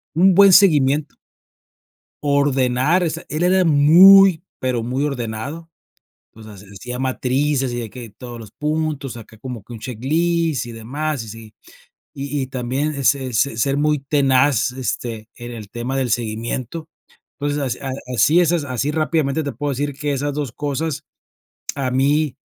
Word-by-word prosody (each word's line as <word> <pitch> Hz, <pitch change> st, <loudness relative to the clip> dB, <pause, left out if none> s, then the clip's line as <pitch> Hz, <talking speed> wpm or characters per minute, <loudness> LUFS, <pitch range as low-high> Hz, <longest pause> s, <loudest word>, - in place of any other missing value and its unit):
un 185 Hz, +3 st, +5 dB
buen 200 Hz, -1 st, +7 dB
seguimiento. 150 Hz, -6 st, +4 dB, 1.1 s
Ordenar, 140 Hz, +3 st, +2 dB
o 170 Hz, -, +1 dB
sea, 160 Hz, +2 st, -6 dB
él 155 Hz, +4 st, -2 dB
era 185 Hz, +1 st, +3 dB
muy, 175 Hz, +4 st, +7 dB, 0.2 s
pero 125 Hz, -3 st, -1 dB
muy 130 Hz, +5 st, -1 dB
ordenado, 140 Hz, +5 st, -5 dB, 0.6 s
entonces 105 Hz, -3 st, -13 dB
hacía 125 Hz, +5 st, -7 dB
matrices 130 Hz, +1 st, 0 dB
y 120 Hz, -, -3 dB
hay 115 Hz, -, -6 dB
que 120 Hz, 0 st, -10 dB
todos 120 Hz, +3 st, -10 dB
los 110 Hz, -4 st, -11 dB
puntos, 150 Hz, -3 st, -3 dB
acá 110 Hz, -1 st, -12 dB
como 120 Hz, -2 st, -7 dB
que 120 Hz, -, -15 dB
un 115 Hz, -, -8 dB
checklist 155 Hz, +5 st, -1 dB
y 120 Hz, -, -8 dB
demás 135 Hz, +4 st, -4 dB
y 110 Hz, -, -10 dB
sí, 110 Hz, 0 st, -11 dB, 0.6 s
y 140 Hz, 0 st, -4 dB
y -, -, -3 dB
también 130 Hz, +4 st, -2 dB
es 140 Hz, 0 st, +3 dB
es 130 Hz, -5 st, -3 dB
se 140 Hz, -4 st, +1 dB
ser 135 Hz, +5 st, 0 dB
muy 150 Hz, 0 st, +2 dB
tenaz, 135 Hz, -3 st, +2 dB
este, 120 Hz, -3 st, -4 dB
en 120 Hz, -1 st, -8 dB
el 110 Hz, -4 st, -9 dB
tema 120 Hz, +3 st, -4 dB
del 130 Hz, -3 st, -1 dB
seguimiento, 120 Hz, +7 st, -3 dB, 0.5 s
entonces 145 Hz, -2 st, -2 dB, 0.3 s
así 150 Hz, -, +4 dB
es, 175 Hz, -1 st, +2 dB
así 140 Hz, -4 st, -1 dB
rápidamente 155 Hz, -1 st, 0 dB
te 140 Hz, -, -4 dB
puedo 145 Hz, +5 st, -3 dB
decir 145 Hz, +1 st, -2 dB
que 145 Hz, -1 st, -1 dB
esas 145 Hz, +1 st, -2 dB
2 145 Hz, -5 st, -3 dB
cosas 145 Hz, +2 st, -3 dB, 0.7 s
a 135 Hz, -2 st, -2 dB
mí, 140 Hz, +3 st, +1 dB
135 Hz, 155 wpm, -20 LUFS, 120-150 Hz, 1.1 s, buen